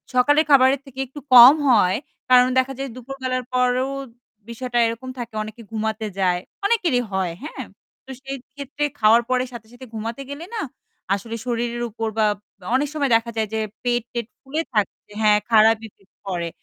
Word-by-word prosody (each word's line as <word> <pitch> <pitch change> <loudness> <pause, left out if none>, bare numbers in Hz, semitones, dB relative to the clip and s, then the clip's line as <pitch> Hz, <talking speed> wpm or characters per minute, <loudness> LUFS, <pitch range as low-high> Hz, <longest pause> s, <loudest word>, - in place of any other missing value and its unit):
সকালের 290 +5 +4
খাবারের 265 0 +6
থেকে 265 -1 -12
একটু 270 +4 -10 0.2
কম 245 +3 +11 0.2
হয় 205 -6 +4 0.3
কারণ 250 0 +7
দেখা 260 +1 0
যায় 275 0 -3
দুপুরবেলার 255 0 -4
পরও 250 +1 +1 0.6
বিষয়টা 240 +1 -4
এরকম 230 +3 -5
থাকে 235 -2 -6
অনেকে 220 +2 -10
ঘুমাতে 220 0 -2
যায়। 180 -2 +1 0.2
অনেকেরই 360 - +2
হয় 190 -2 0
হ্যাঁ, 305 - -6 0.4
তো - - -19
সেই 275 0 -5 0.2
ক্ষেত্রে 285 +1 -5 0.2
খাওয়ার 225 +2 +5
পরে 255 0 +2
সাথে, 220 -2 -10
সাথে 250 +2 -11
ঘুমাতে 225 +4 -5
গেলে 295 +4 -7
না 435 - -2 0.5
আসলে 225 +3 -6
শরীরের 240 0 -2
উপর 225 +1 -3
বা 220 - +3 0.5
অনেক 285 +3 +1
সময় 285 -4 0
দেখা 230 +1 0
যায় 220 -1 0
যে 220 - 0 0.2
পেট-টেট 240 -1 -2
ফুলে 290 +4 -3
থাকছে, 210 -1 -2
হ্যাঁ, 210 -1 +5
খারাপ 220 0 +6
effect 195 -2 -26
পরে। 175 -3 -2
240 Hz, 165 wpm, -22 LUFS, 220-265 Hz, 0.6 s, কম